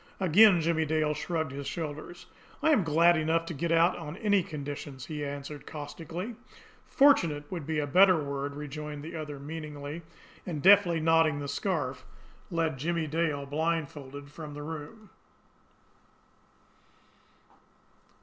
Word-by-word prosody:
Again 190 0 +6
Jimmie 160 -1 +1
Dale 155 0 +1
shrugged 160 -2 -2
his 140 0 -6
shoulders. 160 +2 -6 0.4
"I 315 - +5
am 255 -11 +4
glad 165 +2 +4
enough 165 +1 +1
to 170 - -5
get 165 +3 -2
out 165 +2 +4
on 160 0 -7
any 205 -2 +3
conditions," 145 -5 -7
he 150 -2 -5
answered 145 0 -6
caustically. 165 +8 -6 0.5
"'Fortunate' 170 - +4
would 170 -6 -5
be 160 -1 0
the 150 - 0
better 185 +5 +6
word," 140 0 -4
rejoined 150 0 -6
the 165 +2 -7
other 150 -2 -5
meaningly 150 +1 -7 0.4
and, 165 -4 -4
deftly 190 -4 +6
knotting 160 -1 +3
the 145 0 -4
scarf, 140 -4 -2 0.5
led 165 -5 -1
Jimmie 165 +2 -1
Dale 150 -2 -1
blindfolded 145 -2 -3
from 150 -1 -8
the 145 - -6
room. 160 +8 -8
155 Hz, 135 wpm, -29 LUFS, 145-170 Hz, 0.5 s, Again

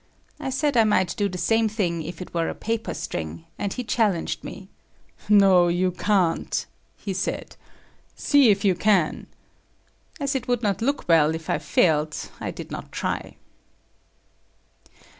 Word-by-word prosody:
I 275 -3 -3
said 280 +1 0
I 225 - +7
might 190 -5 +2
do 205 -1 0
the 180 - -6
same 225 +3 +2
thing 180 -6 -1
if 170 +3 -6
it - - -15
were 165 -1 0
a - - -5
paper 225 0 -3
string, 80 0 -5
and 200 - -2
he 250 - -4
challenged 210 -7 0
me. 190 0 -9 0.6
"No, 195 -4 +6
you 180 +2 +1
can't," 180 -2 0 0.3
he 195 - -4
said. 190 +1 -3 0.6
"See 285 -5 +4
if 200 0 +2
you 190 - +5
can." 185 -3 +1 0.9
As 280 -1 -1
it 260 -3 -3
would 245 -1 0
not 200 -1 0
look 280 +5 -1
well 160 -2 +4
if 160 0 -5
I - - +1
failed, 155 -2 +2 0.2
I - - -4
did - - -8
not - - -7
try. - - -3
195 Hz, 160 wpm, -24 LUFS, 170-225 Hz, 0.9 s, I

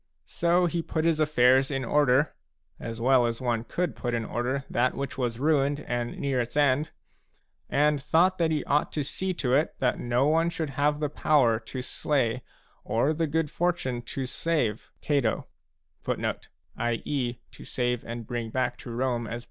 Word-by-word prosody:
So 175 +1 +2
he 170 0 0
put 160 0 -2
his 165 -2 +2
affairs 130 -3 +4
in 135 -3 -2
order, 145 +2 +3 0.2
— - - -49
as 115 0 -6
well 125 0 +4
as 115 -1 -3
one 120 -3 -1
could 180 +8 -2
put 120 -1 -2
in 115 -1 -2
order 130 +5 -2
that 125 +2 +1
which 140 -2 -4
was 120 -3 -2
ruined 145 0 +2
and 120 0 -3
near 135 -3 0
its 120 +4 -5
end, 145 +1 +3 0.5
— - - -45
and 150 0 +2
thought 175 +6 +3
that 165 -1 +3
he 155 -2 0
ought 145 +1 +1
to 150 - -1
see 190 +7 -2
to 125 -6 0
it 150 +4 +2
that 125 -2 0
no 120 +2 +1
one 165 +3 +3
should 160 -4 -3
have 145 +2 +1
the 150 - 0
power 130 -7 +3
to 125 +3 -6
slay 130 -4 0 0.4
or 125 +7 +1
the 165 +1 0
good 155 0 -1
fortune 170 -9 -1 0.2
to 135 - -1
save 130 -5 0 0.2
c 145 -2 +2
Cato. 115 -3 -1
140 Hz, 155 wpm, -27 LUFS, 125-155 Hz, 0.5 s, affairs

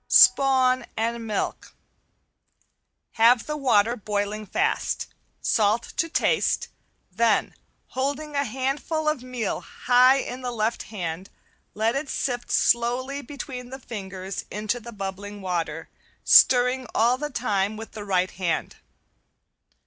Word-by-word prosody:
~SPAWN 260 -2 +5
AND 230 +1 -2
MILK~ 210 - -3 1.5
Have 235 +1 +6
the 300 - -3
water 235 -5 +3
boiling 210 0 -3
fast. 390 - 0 0.4
Salt 220 +2 +1
to 330 - 0
taste, - - +1 0.4
then 220 +2 +2 0.4
holding 285 +3 -3
a 280 - +2
handful 275 +6 -2
of 305 -4 +1
meal 250 -4 -3
high 250 +1 +4
in 255 -1 -4
the 250 - -3
left 225 0 -1
hand, 180 -3 -5 0.5
let 220 +3 +1
it 275 0 -3
sift 245 -2 -2
slowly 250 +4 +1
between 255 -2 -8
the 265 - -7
fingers 195 -6 -6
into 215 +3 -2
the 235 0 -10
bubbling 205 0 -6
water, 165 -4 -3 0.4
stirring 250 0 +5
all 240 +3 +3
the 295 0 -3
time 215 -5 -1
with 225 0 -8
the 210 - -7
right 185 -2 0
hand. 175 -3 -2
235 Hz, 125 wpm, -25 LUFS, 205-260 Hz, 1.5 s, Have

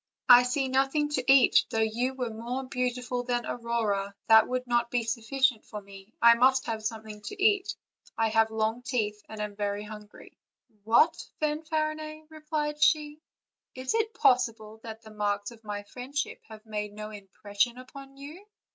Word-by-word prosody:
I 245 -1 +10
see 255 +2 0
nothing 270 +3 +1
to 265 -3 +1
eat; 270 -3 +6
though - - -3
you 235 +4 0
were 250 -3 -3
more 240 +4 -4
beautiful 250 -1 -2
than 240 -1 -2
Aurora, 215 -4 -2
that 220 -1 +7
would 255 0 -2
not 240 -1 +1
be 240 -1 0
sufficient 230 +2 0
for 210 - -8
me; 195 +1 -14
I 235 0 +8
must 260 +3 +3
have 220 -1 -4
something 215 -1 -5
to 395 - -8
eat; 405 -1 +2 0.4
I 225 0 +2
have 225 0 +3
long 220 +2 -1
teeth 220 -5 -2
and 220 - -8
am 210 -1 -4
very 205 0 -2
hungry." 210 -1 -12 0.5
"What, 235 +9 +4 0.2
Fanfarinet!" 310 0 -3
replied 300 -1 -3
she, 300 -1 +2 0.6
"is 255 0 -2
it 450 0 0
possible 230 -4 +1
that 225 0 -9
the 220 - -13
marks 205 -1 -2
of 230 -1 -16
my 205 -1 -5
friendship 260 +6 -5
have 220 0 -12
made 210 -1 -4
no 215 0 -7
impression 205 +3 -2
upon 270 +2 -12
you 300 +7 -10
240 Hz, 165 wpm, -28 LUFS, 215-270 Hz, 0.6 s, I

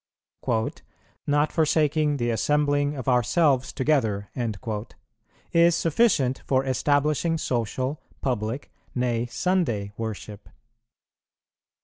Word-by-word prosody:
"Not 145 +1 +2
forsaking 155 -2 +2
the 120 -2 0
assembling 145 +3 +1
of 130 -2 -6
ourselves 130 +2 +2
together" 115 -8 0 1.2
is 170 0 +5
sufficient 160 - +2
for 130 0 +2
establishing 145 +4 +1
social, 130 +2 -2 0.2
public, 120 0 -2 0.2
nay, 120 -2 0
Sunday 120 - 0
worship. 110 -2 -6
135 Hz, 80 wpm, -25 LUFS, 120-150 Hz, 1.2 s, is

